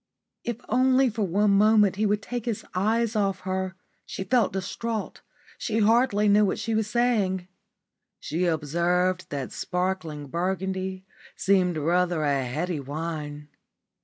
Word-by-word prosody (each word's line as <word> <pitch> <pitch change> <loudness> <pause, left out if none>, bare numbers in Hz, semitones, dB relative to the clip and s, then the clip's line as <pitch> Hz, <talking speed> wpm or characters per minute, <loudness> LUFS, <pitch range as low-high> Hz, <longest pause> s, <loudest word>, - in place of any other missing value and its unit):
If 235 0 -4
only 255 +1 +3
for 220 +1 -4
one 200 +2 +2
moment 205 -1 +4
he 215 +1 +2
would 205 0 0
take 245 -2 -4
his 230 -4 -3
eyes 220 +4 +1
off 200 -2 0
her. 190 0 -3 0.3
She - - -5
felt 245 +4 +2
distraught. 205 +3 -4 0.4
She 220 - -1
hardly 220 -1 +3
knew 205 +1 +5
what 195 - +1
she 225 - -2
was 220 -1 +1
saying. 210 -7 +1 0.7
She 170 +4 -2
observed 175 +3 0
that 140 -3 -4
sparkling 180 -5 -3
Burgundy 190 +4 -3 0.3
seemed 185 -3 +2
rather 170 +1 +1
a 140 -2 +1
heady 155 +6 -2
wine. 150 0 -5
190 Hz, 135 wpm, -26 LUFS, 170-215 Hz, 0.7 s, knew